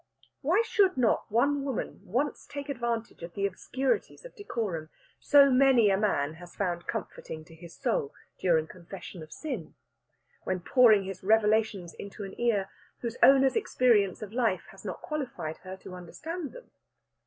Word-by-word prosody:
Why 350 +11 +3
should 395 -7 +3
not 235 -3 +1
one 280 +5 +2
woman 270 -4 -4
once 265 +9 -2
take 285 0 -7
advantage 235 -6 -3
of 170 0 -8
the 200 - 0
obscurities 260 - -2
of - - -11
decorum 205 - -3 0.3
so 280 -1 +6
many 255 -5 +5
a - - +4
man 155 -8 +1
has 175 0 -12
found 175 -3 -2
comforting 155 -1 -5
to 165 - -16
his 170 +1 -12
soul 450 -4 -1 0.3
during 165 -4 +3
confession 180 +1 -10
of 155 0 -11
sin, 255 - -6 0.7
when 185 -1 -1
pouring 220 -1 +5
his 190 -1 -6
revelations 215 -3 +2
into 200 +1 -8
an 195 -1 -7
ear 210 -5 +2 0.3
whose 235 -1 -4
owner's 270 -1 +6
experience 230 - +2
of 210 0 -8
life 230 -7 +1
has 195 - -14
not 190 -3 -6
qualified 260 - -4
her 185 0 -9
to 190 - -11
understand 300 - -6
them. - - -13
220 Hz, 160 wpm, -29 LUFS, 185-270 Hz, 0.7 s, so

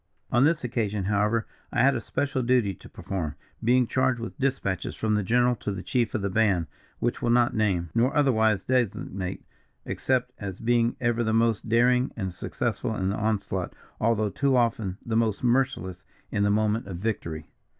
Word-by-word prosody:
"On 120 +3 +4
this 160 -1 +2
occasion, 110 -5 -1
however, 105 +3 +1 0.3
I 120 - +2
had 135 0 +4
a 120 - -2
special 140 +3 -1
duty 120 -5 +2
to - - -14
perform, 85 -7 -4 0.3
being 125 +2 +4
charged 130 0 +1
with 115 - -6
dispatches 130 -8 -1
from 110 -1 0
the 105 - +2
general 120 +5 +2
to 105 - -4
the 95 -2 -5
chief 120 -4 0
of 105 - -1
the 100 - 0
band, 100 -5 +2 0.3
which 120 - -1
will 120 - 0
not 120 0 +3
name, 95 -7 0
nor 120 +3 +3
otherwise 110 -8 +3
designate, 100 -6 -2 0.4
except 125 -1 0
as 95 -3 -6
being 120 0 +2
ever 120 -1 +1
the 110 -1 0
most 115 -1 +1
daring 125 +3 +3
and 95 -4 -3
successful - - -2
in 95 0 -1
the 100 - -1
onslaught, 100 -4 -2 0.2
although 110 -2 +1
too 135 +2 +2
often 110 -6 0
the 115 - -2
most 110 -2 +1
merciless 120 -7 0 0.3
in 100 - 0
the 100 - +3
moment 105 +1 +1
of 95 -3 -5
victory." 85 -7 -4
115 Hz, 180 wpm, -26 LUFS, 100-125 Hz, 0.4 s, On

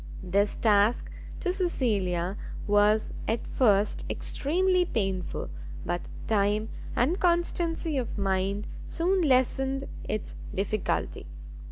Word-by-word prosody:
This 200 +3 +1
task 210 +1 +3 0.3
to 360 - 0
Cecilia 200 - 0 0.3
was 210 +1 +3
at 225 0 -1
first 210 -5 +2
extremely 365 +5 +2
painful; 195 - -2 0.3
but 175 0 -3 0.2
time 210 +1 +1 0.3
and 310 - +2
constancy 340 -3 +1
of 240 - -4
mind 195 +1 0 0.2
soon 365 +3 +1
lessened 270 -1 +2 0.3
its 215 - -3 0.2
difficulty. 200 - -1
220 Hz, 95 wpm, -28 LUFS, 200-320 Hz, 0.3 s, task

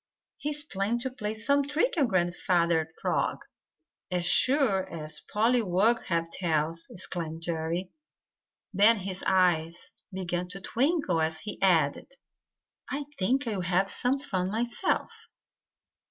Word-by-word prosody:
He 295 - -3
is 295 0 -2
planning 205 -3 -1
to 260 +1 -2
play 215 -3 -4
some 280 +6 +2
trick 300 - 0
on 290 -6 +3
Grandfather 175 -3 +1
Frog - - -1 0.6
as 180 -2 -1
sure 235 -1 +3
as 155 -2 -6
pollywogs 225 -1 +2
have 165 -1 -1
tails!" 165 -1 -1
exclaimed 165 -3 -4
Jerry. 170 +2 -2 0.8
Then 210 +4 +5
his 190 -1 -5
eyes 175 -3 +1 0.2
began 180 -1 -3
to 195 +2 -7
twinkle 245 - +1
as 160 0 0
he 210 - -7
added: 165 -7 +2 0.8
"I 285 +1 -3
think 260 +8 +1
I'll 210 -5 -2
have 180 +2 +2
some 255 +3 +1
fun 190 -10 -2
myself." 235 +3 -1
190 Hz, 125 wpm, -28 LUFS, 170-235 Hz, 0.8 s, Then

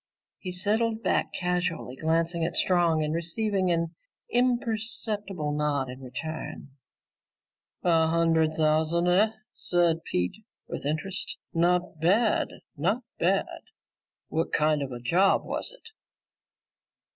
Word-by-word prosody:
He 185 - -5
settled 220 +5 0
back, - - +1
casually 180 -7 -2
glancing 165 +3 0
at 165 +1 -1
Strong 170 -4 +3
and 150 0 -1
receiving 185 +3 0
an 170 -1 0 0.4
imperceptible 220 -8 0
nod 145 -3 0
in 130 +1 -10
return. 140 +4 -6 1.1
"A 165 -2 +4
hundred 165 -1 +2
thousand, 160 +2 +2
eh?" 205 +5 +4 0.2
said 170 -2 +1
Pete 90 - -2 0.2
with - - -4
interest. 170 +6 -2 0.2
"Not 175 -1 +1
bad, 205 +8 +3 0.3
not 195 - 0 0.2
bad. 190 +3 +1 0.7
What 160 +1 -1
kind 150 -1 +2
of 135 -2 -4
a 120 - -5
job 175 +11 +3
was - - -3
it?" - - -15
170 Hz, 115 wpm, -27 LUFS, 155-195 Hz, 1.1 s, A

